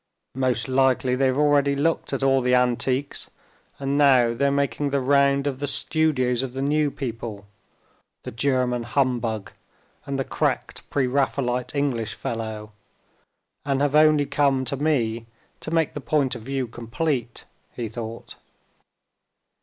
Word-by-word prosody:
"Most 125 -3 0
likely 130 -1 +2
they've 130 0 +1
already 145 -1 +3
looked 160 +4 0
at 135 -1 -2
all 135 0 +3
the 125 0 +3
antiques, 125 +2 0 0.5
and 140 +1 -1
now 130 -5 +5
they're 140 +4 +1
making 140 0 0
the 140 0 +1
round 140 +1 +3
of 135 -2 -2
the 145 - -2
studios 135 -5 +1
of 130 -2 -5
the 135 - -4
new 150 +1 +2
people, 115 -6 -6 0.8
the - - -6
German 125 0 0
humbug, 115 -4 -1 0.6
and 140 -1 -2
the 135 - 0
cracked - - -2
Pre 140 -2 +1
Raphaelite 125 0 -1
English 120 -6 -1
fellow, 110 -2 -5 0.9
and 140 -1 0
have 145 0 +1
only 150 -1 +5
come 135 -2 +1
to 135 - -2
me 120 -6 0 0.3
to - - -7
make 165 -2 +1
the 145 - -6
point 140 -1 +1
of 120 - -7
view 135 +2 -2
complete," 120 +2 -3 0.3
he 120 -2 -3
thought. 115 +1 -8
130 Hz, 145 wpm, -24 LUFS, 120-140 Hz, 0.9 s, now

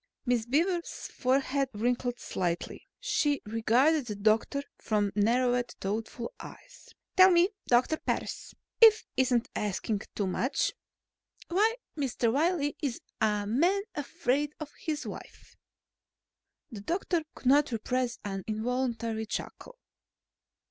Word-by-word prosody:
Miss 240 -2 +1
Beaver's 340 +6 0
forehead 270 +1 +1
wrinkled 245 +2 0
slightly. 175 -2 -3
She 295 - +1
regarded 240 +7 +2
the 210 - -3
doctor 220 +7 +1 0.2
from 205 -2 0
narrowed, 245 +3 +2
thoughtful 220 +4 -4
eyes. - - -12 0.3
"Tell 375 -1 +9
me, 350 +1 +5 0.2
Doctor 255 +6 +3
Parris, - - -4 0.3
if 440 -1 +9
it 260 - +4
isn't 250 -1 +1
asking 210 0 -1
too 205 - 0
much, 255 +9 0 0.8
why 425 +6 +3 0.2
Mr. 250 -5 0
Wiley 295 0 +1
is 275 -6 -2 0.2
a 210 -1 +2
Man 345 - +2
Afraid 295 -1 -1
of 300 -2 -6
his 305 -2 -3
Wife?" - - -10 1.2
The 210 -4 -7
doctor 345 - 0
could - - -14
not 280 +2 +5
repress 245 +2 -1
an 195 -2 -4
involuntary 230 0 -2
chuckle. - - -6
255 Hz, 120 wpm, -29 LUFS, 220-300 Hz, 1.2 s, Tell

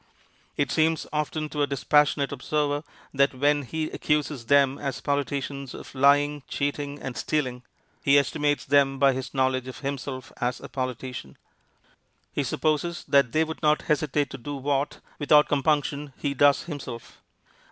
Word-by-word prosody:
It - - 0
seems 160 0 +2
often 150 +1 -1
to 150 - -3
a 145 - +2
dispassionate 145 +1 +2
observer 145 +1 -1 0.3
that 140 -1 +2
when 145 +2 +2
he 155 +4 -4
accuses 150 -5 -1
them 140 0 +4
as 135 -2 -3
politicians 140 -1 -2
of - - -10
lying, 145 +2 +3
cheating, 145 0 -3
and 130 -2 -6
stealing, 130 -5 -1 0.4
he 140 +1 +5
estimates 145 +1 +1
them 135 -1 +3
by 135 0 +4
his 130 +2 -6
knowledge 130 -1 +1
of 130 - -8
himself 135 -2 -5
as 125 0 -1
a - - -9
politician. 130 - -5 1.0
He - - 0
supposes 160 +3 -1
that 140 -4 +4
they 155 +4 +3
would 160 0 -6
not 150 -1 +3
hesitate 150 -2 0
to 135 - -7
do 145 +4 -5
what, 140 +1 -1 0.2
without 150 0 +5
compunction, 145 0 0
he 140 -1 -2
does 140 +1 +4
himself. 130 -7 -8
140 Hz, 150 wpm, -26 LUFS, 135-150 Hz, 1.0 s, he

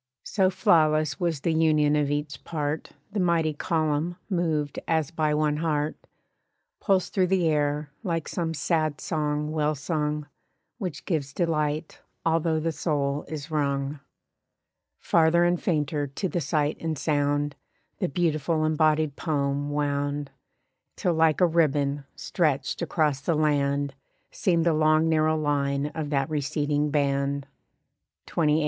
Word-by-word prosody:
So 190 -3 +2
flawless 155 -5 +3
was 170 -5 -1
the 165 - +1
union 155 -2 +3
of 145 -1 +1
each 145 0 -3
part 150 -1 -3 0.2
The 210 - -2
mighty 170 -3 +2
column 155 +2 0 0.2
(moved 160 -5 0
as 160 -1 +1
by 155 -3 +1
one 150 -1 +1
heart) 155 -1 0 0.8
Pulsed 190 -3 +1
through 185 -2 +3
the 180 -2 +2
air, 150 -1 0
like 165 -7 -2
some 165 -2 -2
sad 155 0 0
song 150 -1 -1
well 155 -1 0
sung, 150 0 -2 0.5
Which 180 -9 -5
gives 145 -6 -2
delight, 155 -2 -1 0.3
although 165 -1 +2
the 165 +1 -1
soul 145 -3 -1
is 155 0 -6
wrung. 140 -1 -1 1.0
Farther 170 +1 +3
and 175 0 +2
fainter 150 -3 0
to 140 +8 -3
the 175 -1 -2
sight 150 0 0
and 160 -2 -2
sound 145 0 0 0.4
The 185 - 0
beautiful 155 0 0
embodied 155 -1 +2
poem 145 -3 -1
wound; 145 0 -1 0.6
Till 175 - 0
like 160 +1 +3
a - - +7
ribbon, 145 -4 +1
stretched 150 -5 -1
across 150 -4 0
the 165 +2 0
land 145 -2 +1 0.4
Seemed 170 -3 +1
the 170 - +4
long 155 +1 +3
narrow 155 0 +3
line 145 -1 0
of 155 -2 -4
that 135 -2 +1
receding 150 0 0
band. 140 -1 0 0.8
XXVIII. 155 -2 +2
155 Hz, 135 wpm, -26 LUFS, 145-165 Hz, 1.0 s, a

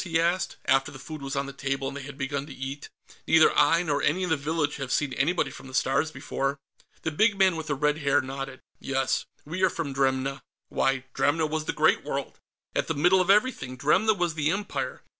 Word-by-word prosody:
he 165 -3 0
asked, 175 +3 0
after 135 +1 +2
the 140 - -10
food 155 +2 -8
was 135 +1 -4
on 140 0 0
the 140 - -7
table 135 0 -2
and - - -5
they 140 - -5
had 135 +1 -9
begun 140 0 -3
to 145 - -9
eat. 135 +2 -6 0.4
"Neither 160 -1 +5
I 165 +3 +4
nor 145 -4 0
any 180 +5 +1
in 180 - -1
the - - +5
village 150 0 -1
have 135 -2 -5
seen 140 -3 +1
anybody 140 +1 +1
from 135 - -11
the 130 - -8
Stars 135 +5 +2
before." 140 -1 -3 0.5
The 160 - -1
big 205 +6 +3
man 190 -3 +4
with 160 -1 -5
the 145 - 0
red 150 +2 +1
hair 145 -1 +3
nodded. 135 0 -6 0.2
"Yes. 135 -1 0 0.2
We 170 +5 -4
are 185 - +5
from 150 -5 -4
Dremna." 135 0 0 0.3
Why, 135 -1 +1
Dremna 160 +2 +2
was 155 0 -2
the - - 0
Great - - +3
World, - - -4 0.4
at - - 0
the 160 - -1
middle 180 +6 +4
of 185 - -1
everything! 200 - +2
Dremna 190 - +3
was 175 -2 0
the 155 -1 0
Empire. 200 +4 -3
145 Hz, 225 wpm, -27 LUFS, 135-165 Hz, 0.5 s, Neither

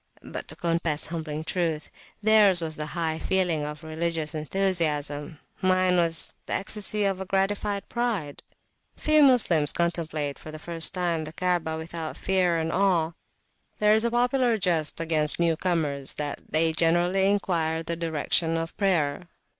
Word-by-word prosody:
But, - - -6
to - - 0
confess 165 -3 -1
humbling 155 -2 -4
truth, 160 -2 -2 0.3
theirs 210 -4 +6
was 160 -2 -2
the 150 0 -4
high 160 -1 -1
feeling 180 -5 0
of 150 +1 -6
religious 160 -1 -2
enthusiasm, 155 -3 -1 0.2
mine 185 -1 +3
was 165 -1 +1
the - - -3
ecstasy 210 +1 -1
of 190 -1 -2
gratified 200 +1 -1
pride. 220 -12 -3 0.5
Few 305 0 +3
Moslems 200 - +4
contemplate 160 -4 -2
for 155 - -9
the 155 - -7
first 165 +2 -1
time 170 -3 -1
the 155 - -9
Kaabah, 175 -3 -1
without 160 0 -6
fear 180 -3 +1
and 160 0 -2
awe: 180 -4 +2 0.7
there 210 0 +4
is 220 +1 +3
a 235 - +2
popular 245 0 +2
jest 165 -7 +1
against 160 -2 +2
new 170 -1 +2
comers, 155 -6 0
that 145 -1 -4
they 160 +1 +3
generally 175 +4 +2
inquire 165 -5 0
the 170 +1 -3
direction 165 0 +1
of 165 0 -4
prayer. 170 -5 0
170 Hz, 150 wpm, -26 LUFS, 160-190 Hz, 0.7 s, theirs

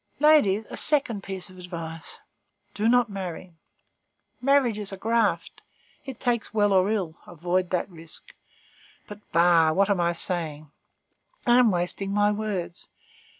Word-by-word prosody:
Ladies, 250 -9 +4
a - - -6
second 270 -9 +1
piece 190 -2 -7
of 185 - -14
advice: 165 -2 -8 0.6
do 215 +2 +1
not 245 0 +4
marry; 185 -3 -7 0.9
marriage 255 -5 +2
is 205 -1 -6
a 195 - -6
graft; 225 +1 0 0.4
it 265 -4 -8
takes 240 -4 -1
well 205 -2 +3
or 190 +1 +3
ill; 185 -7 -2
avoid 175 +2 -1
that 180 - -1
risk. 165 -3 -9 0.7
But 210 0 -9
bah! 170 -2 +4
what 200 +4 +2
am 195 - +1
I 170 0 +1
saying? 155 -4 -2 0.7
I 240 +1 +5
am 245 -3 +5
wasting 185 +2 -2
my 205 +1 +3
words. 205 -5 -4
195 Hz, 145 wpm, -25 LUFS, 175-220 Hz, 0.9 s, I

